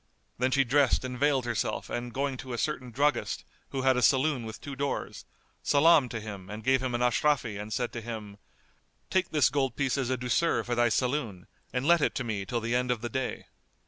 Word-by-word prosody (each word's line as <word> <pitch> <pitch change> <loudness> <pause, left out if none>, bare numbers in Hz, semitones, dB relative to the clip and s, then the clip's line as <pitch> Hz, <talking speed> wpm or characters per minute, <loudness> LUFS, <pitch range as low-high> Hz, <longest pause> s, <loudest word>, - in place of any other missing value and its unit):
Then 130 +1 +2
she 140 +1 +3
dressed 135 0 +2
and 125 0 -4
veiled 140 -3 +2
herself 120 -3 -2
and 120 0 -4
going 135 +2 -1
to 130 -1 -7
a - - -3
certain 130 -2 -2
druggist, 140 +2 0 0.2
who 135 -1 -3
had 130 -1 +4
a - - +1
saloon 130 +1 +3
with 110 - -8
two 140 -1 -7
doors, 140 +1 -3 0.4
salamed 150 -2 +5
to 115 - -4
him 100 -4 -8
and 105 +1 -7
gave 130 +1 +3
him 130 -2 -1
an 120 - -1
ashrafí 125 -4 +1
and 105 +1 -8
said 120 +3 -2
to 115 - -4
him, 110 -3 -7 0.7
"Take 185 -1 +2
this 150 -5 +3
gold 135 -4 0
piece 140 -1 0
as 130 -2 -1
a 130 - 0
douceur 125 +7 +1
for 120 - -3
thy 120 0 +3
saloon 120 -7 -1 0.3
and 125 +1 -2
let 170 0 +5
it - - +1
to 130 - -1
me 105 -4 -3
till 120 -1 -1
the 115 +2 -2
end 125 0 +1
of 120 -3 0
the 120 - -3
day." 130 +2 -3
125 Hz, 225 wpm, -29 LUFS, 115-140 Hz, 0.7 s, salamed